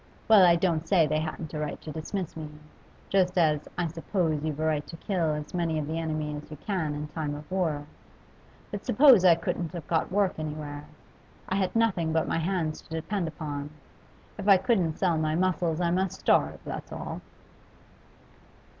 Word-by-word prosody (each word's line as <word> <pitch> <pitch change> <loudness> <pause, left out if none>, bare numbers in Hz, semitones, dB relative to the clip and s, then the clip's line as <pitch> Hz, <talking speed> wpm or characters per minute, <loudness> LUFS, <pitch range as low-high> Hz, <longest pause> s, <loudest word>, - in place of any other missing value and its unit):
Well, 215 -4 +8
I 175 -1 +7
don't 165 -2 0
say 180 -5 +5
they 155 +1 0
hadn't 160 +1 -5
a 155 - -3
right 150 -1 -3
to 155 - -6
dismiss 165 +3 -4
me, 155 -2 -6 0.6
just 185 -1 +2
as 155 -3 +2
I 175 - +1
suppose 165 -1 -1
you've 155 -1 -3
a 160 - 0
right 150 -2 0
to 165 - -9
kill 170 -4 0
as 150 0 -6
many 170 -3 0
of 155 - -1
the 160 +2 -3
enemy 155 -2 -2
as 150 0 -8
you 150 - -8
can 165 -5 -2
in 150 +1 -4
time 150 -2 -3
of 150 +3 -10
war. 160 -6 0 0.9
But 205 - -5
suppose 255 -4 +6
I 175 -3 +7
couldn't 165 0 -3
have 170 -5 -6
got 165 +2 0
work 195 -3 +1
anywhere. 150 -1 -5 0.6
I 190 - -1
had 190 0 0
nothing 185 -8 +2
but 160 -1 +1
my - - 0
hands 165 -2 -1
to - - -23
depend 170 +3 -2
upon; 150 -2 -5 0.7
if 200 - -4
I 200 -2 +8
couldn't 180 -7 +1
sell 175 -4 +2
my 155 0 0
muscles 175 -2 +1
I 170 -1 +1
must 185 0 -1
starve, - - +3
that's - - -6
all. - - -5
165 Hz, 190 wpm, -28 LUFS, 155-185 Hz, 0.9 s, Well